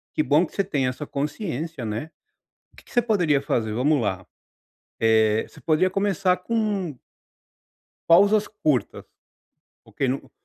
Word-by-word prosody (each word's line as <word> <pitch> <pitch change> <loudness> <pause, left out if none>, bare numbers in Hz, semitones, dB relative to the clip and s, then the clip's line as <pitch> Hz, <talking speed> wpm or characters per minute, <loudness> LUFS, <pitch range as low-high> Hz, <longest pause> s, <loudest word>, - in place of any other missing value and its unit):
Que 155 - +2
bom 150 +4 +3
que - - -15
você 200 - +1
tem 145 -9 -1
essa 130 +4 -4
consciência, 150 - -4
né. 110 +9 -4 0.6
O - - -25
que - - -16
que - - -19
você 240 - +3
poderia 180 -11 +2
fazer? 110 -5 -1
Vamos 140 +4 +2
lá, 95 -4 -2 0.8
eh, 110 -1 +3
você - - -16
poderia 165 +4 +2
começar 190 -2 +1
com 205 - -2 1.1
Pausas 200 +5 +5
curtas, 155 - -1 0.8
porque 135 - -3
no 130 +2 -3
155 Hz, 145 wpm, -24 LUFS, 130-195 Hz, 1.1 s, Pausas